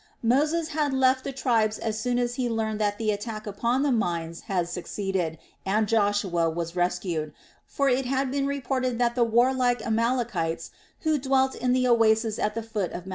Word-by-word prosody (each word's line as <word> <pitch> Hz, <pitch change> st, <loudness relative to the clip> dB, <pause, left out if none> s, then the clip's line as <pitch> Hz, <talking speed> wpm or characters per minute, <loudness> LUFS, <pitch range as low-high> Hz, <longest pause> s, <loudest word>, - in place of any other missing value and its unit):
Moses 305 Hz, +7 st, +2 dB
had 295 Hz, -3 st, 0 dB
left 260 Hz, 0 st, +3 dB
the -, -, -3 dB
tribes 230 Hz, -5 st, +1 dB
as 220 Hz, -1 st, -3 dB
soon 245 Hz, +2 st, 0 dB
as 245 Hz, -1 st, 0 dB
he 245 Hz, -1 st, -1 dB
learned 220 Hz, -2 st, -1 dB
that 205 Hz, -1 st, 0 dB
the 220 Hz, -2 st, 0 dB
attack 215 Hz, +1 st, -5 dB
upon 235 Hz, +6 st, 0 dB
the 290 Hz, -, +2 dB
mines 170 Hz, -7 st, -1 dB
had 180 Hz, -3 st, 0 dB
succeeded 180 Hz, -1 st, -3 dB, 0.3 s
and 210 Hz, +2 st, +1 dB
Joshua 205 Hz, -6 st, +1 dB
was 170 Hz, +1 st, -4 dB
rescued; 175 Hz, -4 st, -1 dB, 0.3 s
for 280 Hz, -, 0 dB
it 255 Hz, 0 st, +1 dB
had 265 Hz, 0 st, 0 dB
been 275 Hz, 0 st, 0 dB
reported 260 Hz, -3 st, -1 dB
that 240 Hz, 0 st, +2 dB
the 245 Hz, -, +2 dB
warlike 245 Hz, +1 st, +2 dB
Amalekites, 225 Hz, -7 st, -1 dB, 0.3 s
who 315 Hz, -3 st, +1 dB
dwelt 265 Hz, 0 st, +2 dB
in 250 Hz, +1 st, -1 dB
the 255 Hz, 0 st, +2 dB
oasis 225 Hz, -2 st, +3 dB
at 210 Hz, +1 st, -1 dB
the 230 Hz, -, -3 dB
foot 215 Hz, -5 st, -3 dB
of 175 Hz, -, -6 dB
Mt. -, -, -8 dB
230 Hz, 185 wpm, -26 LUFS, 205-255 Hz, 0.3 s, left